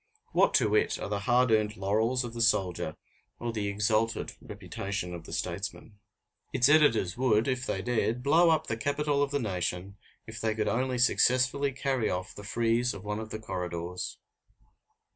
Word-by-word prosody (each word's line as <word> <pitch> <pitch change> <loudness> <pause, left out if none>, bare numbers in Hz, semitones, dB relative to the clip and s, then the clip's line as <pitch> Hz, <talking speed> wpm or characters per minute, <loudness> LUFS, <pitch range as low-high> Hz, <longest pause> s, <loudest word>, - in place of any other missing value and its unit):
What - - +3
to - - +3
it - - +2
are - - -5
the 100 -1 -1
hard 125 0 +4
earned 110 -1 +2
laurels 110 +6 +1
of 120 -1 -6
the 120 - -3
soldier 90 -8 +1 0.4
or 120 -1 -4
the 105 -2 -2
exalted 110 +2 0
reputation 100 -3 -5
of 85 -2 -8
the - - -10
statesman? 100 +3 -5 0.5
Its 125 -1 +3
editors 130 - +4
would, 115 -3 +2
if 130 -1 -1
they 95 - -2
dared, 120 0 0
blow 165 +5 +5
up 160 -1 +2
the 110 - -3
Capitol 145 +3 0
of 145 - +1
the 145 - 0
nation 95 -3 -3 0.3
if 110 0 -8
they 110 -1 0
could 110 -1 -1
only 130 +1 0
successfully 130 +3 +3
carry 130 -3 -1
off 95 +3 -3
the 100 - -10
frieze 115 +3 0
of 100 - -9
one 105 +1 -3
of 110 0 -6
the 110 - -4
corridors. 90 -4 -5
110 Hz, 180 wpm, -29 LUFS, 100-125 Hz, 0.5 s, blow